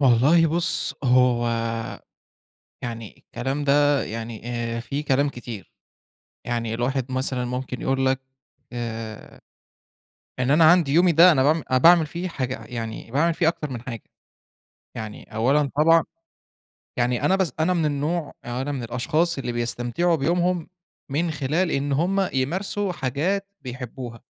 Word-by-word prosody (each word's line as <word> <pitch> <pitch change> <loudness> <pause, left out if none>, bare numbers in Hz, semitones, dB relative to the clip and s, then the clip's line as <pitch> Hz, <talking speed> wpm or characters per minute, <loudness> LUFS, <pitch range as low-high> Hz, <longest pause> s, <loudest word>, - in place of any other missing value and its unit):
والله 140 +6 +5
بُص، 165 +1 0
هو 125 -2 +3 1.3
يعني 115 -3 -6
الكلام 135 +5 -4
ده 145 0 +3
يعني 115 0 -6 0.3
آآ - - -3
في 140 +5 -4
كلام 140 0 +2
كتير. 120 -6 -8 0.7
يعني 115 -2 -2
الواحد 130 +2 -2
مثلًا 130 -1 -1
ممكن 125 0 -4
يقول 135 0 +1
لك 130 0 +1 0.5
آآ 115 -2 -6 1.0
إن 125 +1 0
أنا 160 +3 +5
عندي 170 -6 +3
يومي 175 +3 +5
ده 170 +3 +8
أنا 130 - +3
باعم 155 +3 +2
أنا 130 - +4
باعمل 165 +3 +6
فيه 170 +4 -4
حاجة 130 -7 -4
يعني 115 -1 -6
باعمل 160 +6 +2
فيه 165 -2 +2
أكتر 150 -3 -3
من 120 -3 -6
حاجة. 115 -4 -7 0.9
يعني 110 0 -8
أولًا 135 +5 +2
طبعًا 165 +2 +5 0.9
يعني 120 0 0
أنا 190 - +4
بس 190 -4 0
أنا 175 +3 +2
من 165 -3 +1
النوع 150 +2 -2
أو 120 +1 -4
أنا 145 +2 -3
من 135 -3 -4
الأشخاص 155 +8 0
اللي 125 -2 -3
بيستمتعوا 120 +8 0
بيومهم 175 +3 0 0.4
من 160 +5 0
خلال 155 +4 0
إن 140 +1 -1
هم 185 +6 +1
يمارسوا 185 +9 -1
حاجات 170 +8 -1
بيحبوها. 125 -2 -7
135 Hz, 145 wpm, -24 LUFS, 120-165 Hz, 1.3 s, ده